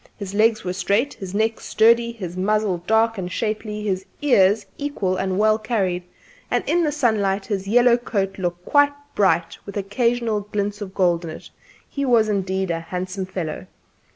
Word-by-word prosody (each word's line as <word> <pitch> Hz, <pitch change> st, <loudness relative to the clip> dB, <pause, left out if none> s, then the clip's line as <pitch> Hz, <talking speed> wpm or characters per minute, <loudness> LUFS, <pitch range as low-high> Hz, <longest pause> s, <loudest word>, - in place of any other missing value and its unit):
His 200 Hz, -2 st, -6 dB
legs 215 Hz, +1 st, +3 dB
were 180 Hz, -, -2 dB
straight; 200 Hz, +8 st, 0 dB
his 190 Hz, 0 st, -7 dB
neck 220 Hz, +1 st, +1 dB
sturdy; 235 Hz, +1 st, +3 dB
his 185 Hz, -7 st, -7 dB
muzzle 200 Hz, -1 st, 0 dB
dark 225 Hz, 0 st, +2 dB
and 180 Hz, -1 st, -4 dB
shapely; 215 Hz, 0 st, -3 dB
his 190 Hz, -2 st, -1 dB, 0.2 s
ears 205 Hz, -6 st, +4 dB
equal 250 Hz, -11 st, -1 dB
and 190 Hz, 0 st, -1 dB
well 215 Hz, +1 st, +3 dB
carried; 200 Hz, -6 st, -1 dB, 0.5 s
and -, -, +1 dB
in 345 Hz, +1 st, +2 dB
the 300 Hz, -, +1 dB
sunlight 210 Hz, -9 st, +1 dB
his 195 Hz, -3 st, -3 dB
yellow 240 Hz, +2 st, +5 dB
coat 200 Hz, -5 st, -2 dB
looked 175 Hz, -1 st, -3 dB
quite 285 Hz, 0 st, +4 dB, 0.2 s
bright, 170 Hz, -4 st, +1 dB
with 200 Hz, 0 st, -7 dB
occasional 230 Hz, +2 st, 0 dB
glints 205 Hz, 0 st, -3 dB
of 195 Hz, -2 st, -7 dB
gold 175 Hz, -3 st, +2 dB
in 165 Hz, -, -5 dB
it. 155 Hz, -, -10 dB, 0.4 s
He 280 Hz, -, -4 dB
was 235 Hz, -5 st, +3 dB
indeed 190 Hz, -2 st, -1 dB
a 165 Hz, -, -1 dB
handsome 185 Hz, +3 st, -4 dB
fellow. 155 Hz, -, -5 dB
205 Hz, 175 wpm, -22 LUFS, 185-225 Hz, 0.5 s, yellow